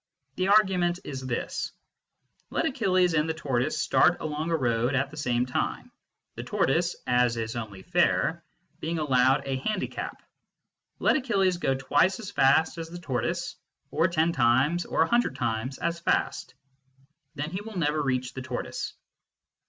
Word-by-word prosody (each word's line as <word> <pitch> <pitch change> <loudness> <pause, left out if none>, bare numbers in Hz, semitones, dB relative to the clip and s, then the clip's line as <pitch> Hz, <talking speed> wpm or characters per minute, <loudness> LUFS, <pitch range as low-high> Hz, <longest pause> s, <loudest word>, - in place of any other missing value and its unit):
The 185 - 0
argument 190 -4 +4
is 135 -2 -6
this: 120 - -3 0.8
Let - - 0
Achilles 185 - +2
and 155 0 +1
the 160 - -1
tortoise 140 0 -1
start 170 +3 +3
along 155 +1 -3
a 165 - +2
road 120 0 +1
at 135 +1 0
the - - -10
same 125 -4 0
time, 125 - -3 0.4
the - - -6
tortoise 170 +6 +1
(as 125 -1 +2
is 115 0 -3
only 105 -5 -6
fair) - - +1 0.4
being 165 +1 -2
allowed 130 -3 +3
a 135 -1 -1
handicap. 205 +9 -4 0.7
Let - - +3
Achilles 195 -9 +1
go 135 -6 0
twice 145 - +2
as 205 -4 -7
fast 160 +1 +3
as 165 0 -6
the 175 - -7
tortoise, 125 -7 -2 0.4
or 165 - +3
ten 170 -1 +2
times 135 +6 +2
or - - +2
a - - -1
hundred 240 +4 +2
times 120 +2 -2
as 170 0 -2
fast. 170 - -1 0.8
Then 150 +2 -4
he 185 +2 -4
will 215 -2 -8
never 150 -2 +1
reach 130 -2 -1
the 130 - -6
tortoise. 125 - -5
150 Hz, 160 wpm, -27 LUFS, 130-175 Hz, 0.8 s, argument